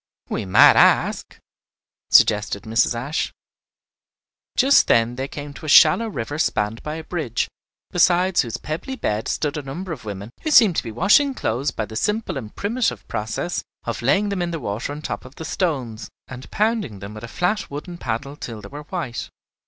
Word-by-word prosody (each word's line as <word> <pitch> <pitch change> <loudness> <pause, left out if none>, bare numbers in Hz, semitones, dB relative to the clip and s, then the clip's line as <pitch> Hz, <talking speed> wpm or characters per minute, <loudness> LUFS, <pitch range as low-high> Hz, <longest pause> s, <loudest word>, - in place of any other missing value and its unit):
"We - - -2
might 95 - +7
ask," - - +3 0.7
suggested 105 -1 +4
Mrs. 115 +2 +1
Ashe. 140 +7 -2 1.3
Just 275 +2 +5
then 115 +1 +3
they 135 +2 -3
came 145 0 -8
to 155 +2 -9
a - - -2
shallow 155 +10 +7
river 145 - -4
spanned 105 -6 0
by 150 0 -5
a 160 - -6
bridge, 155 -10 -2 0.4
beside 180 +1 +3
whose 115 -3 0
pebbly 165 +13 -5
bed 110 - -2
stood 150 0 -1
a - - -3
number 165 +7 -6
of 145 -7 -6
women 100 +1 -7
who 315 - -2
seemed 225 - +6
to - - +1
be 115 - -6
washing 215 - +4
clothes 130 - -1
by 110 - -3
the 110 - -10
simple 210 - -1
and 110 -6 -7
primitive 205 - -1
process 110 +11 -3 0.2
of 115 - -4
laying 150 - +2
them 200 -2 -2
in 175 - -1
the 165 -1 -4
water 105 +3 -4
on 150 +1 -7
top - - -4
of 130 +2 -14
the 160 - -7
stones, 130 - -2 0.2
and 130 0 -10
pounding 215 - 0
them 100 +2 -8
with 110 +1 -9
a - - -5
flat 180 - -1
wooden 170 +5 -7
paddle 130 +3 -4
till 115 -6 -7
they - - -10
were 145 +1 -8
white. 150 -9 -4
145 Hz, 190 wpm, -22 LUFS, 115-180 Hz, 1.3 s, might